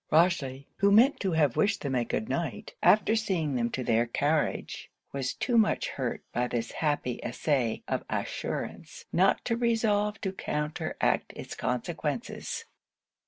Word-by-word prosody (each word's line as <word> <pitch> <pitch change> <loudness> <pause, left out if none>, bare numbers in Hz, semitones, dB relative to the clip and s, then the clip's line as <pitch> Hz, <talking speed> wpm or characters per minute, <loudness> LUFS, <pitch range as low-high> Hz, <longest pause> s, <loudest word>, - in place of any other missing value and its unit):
Rochely, 150 -5 +2
who 200 0 +4
meant 240 +7 +6
to 190 -3 0
have 150 -6 +3
wished 205 -1 +2
them 140 -2 -2
a 125 -2 +2
good 110 -2 -2
night 135 -5 -3
after 215 +1 +5
seeing 185 -9 0
them 120 -2 +1
to 130 - -3
their 115 0 +2
carriage, 145 +5 -1 0.2
was 135 -2 -2
too 240 -2 +2
much 215 - +2
hurt 130 -3 -3
by 125 +1 +1
this 115 -1 -2
happy 145 -5 -1
essay 130 -7 0
of - - -1
assurance - - -4
not 190 +3 +3
to 230 - +1
resolve 220 -3 +1
to 190 - -1
counteract 150 -4 -1
it's - - -7
consequences. - - -3
155 Hz, 150 wpm, -29 LUFS, 130-205 Hz, 0.2 s, meant